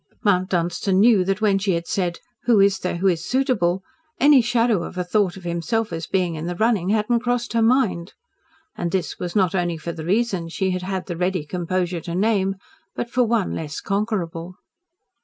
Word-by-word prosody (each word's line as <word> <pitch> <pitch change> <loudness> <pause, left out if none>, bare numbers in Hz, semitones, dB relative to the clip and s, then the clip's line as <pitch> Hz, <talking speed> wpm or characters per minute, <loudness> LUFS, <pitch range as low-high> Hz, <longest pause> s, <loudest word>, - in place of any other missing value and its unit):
Mount 185 -2 +2
Dunstan 175 +2 0
knew 215 -3 +5
that 195 +2 -1
when 200 -2 +3
she 195 -1 0
had 170 0 -2
said, 175 -2 -1 0.3
"Who 235 -4 +4
is 195 0 +4
there 180 - -2
who 185 - -3
is 170 -3 +1
suitable?" 205 -8 +1 0.4
any 285 -1 +6
shadow 235 -4 +2
of 185 - -7
a 180 - 0
thought 190 0 0
of 190 - -12
himself 175 +5 -2
as 165 -1 -4
being 180 -2 0
in 160 +1 -5
the 175 - -3
running 215 -3 +1
had 210 0 +1
not 235 -1 +2
crossed 245 -1 -1
her 230 - +2
mind. 225 -7 +1 0.6
And 175 - -2
this 190 -2 -2
was 175 +2 -4
not 190 -3 +3
only 175 -3 0
for 170 +2 -5
the 160 -1 -7
reasons 185 -3 0
she 190 -1 0
had 185 0 -2
had 190 0 -3
the 175 - -5
ready 180 -2 -1
composure 175 +1 -2
to 170 +2 -5
name, 195 -1 +1 0.4
but 240 - -4
for 250 0 +3
one 225 -3 0
less 155 -2 -5
conquerable. 185 -4 -3
190 Hz, 205 wpm, -22 LUFS, 175-220 Hz, 0.6 s, any